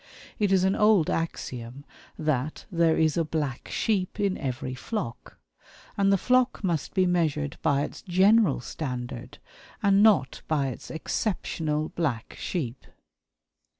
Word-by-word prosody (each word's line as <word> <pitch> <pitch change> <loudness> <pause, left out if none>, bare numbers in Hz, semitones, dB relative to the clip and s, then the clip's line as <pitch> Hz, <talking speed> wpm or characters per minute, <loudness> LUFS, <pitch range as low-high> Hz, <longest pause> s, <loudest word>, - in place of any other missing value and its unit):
It 205 -2 +2
is 190 -1 +4
an 190 +1 +2
old 210 -6 +4
axiom 130 -5 -4 0.3
that 155 -2 -1
"there 165 -2 +3
is 160 -1 +2
a 165 - +3
black 150 -4 -3
sheep 200 -3 -1
in 200 -2 +1
every 130 -1 -4
flock"; 130 - -5 0.6
and 195 0 +3
the 195 - +5
flock 255 +3 +2
must 170 -4 -1
be 185 -1 +4
measured 155 -5 0
by 145 -3 +2
its - - -6
general 190 - +4
standard, 125 -3 -5 0.5
and 200 0 +5
not 210 -11 +4
by 145 -4 +1
its 125 - -8
exceptional 160 -3 -2
black 135 -10 -2
sheep. 130 -9 -4
160 Hz, 135 wpm, -27 LUFS, 140-195 Hz, 0.6 s, the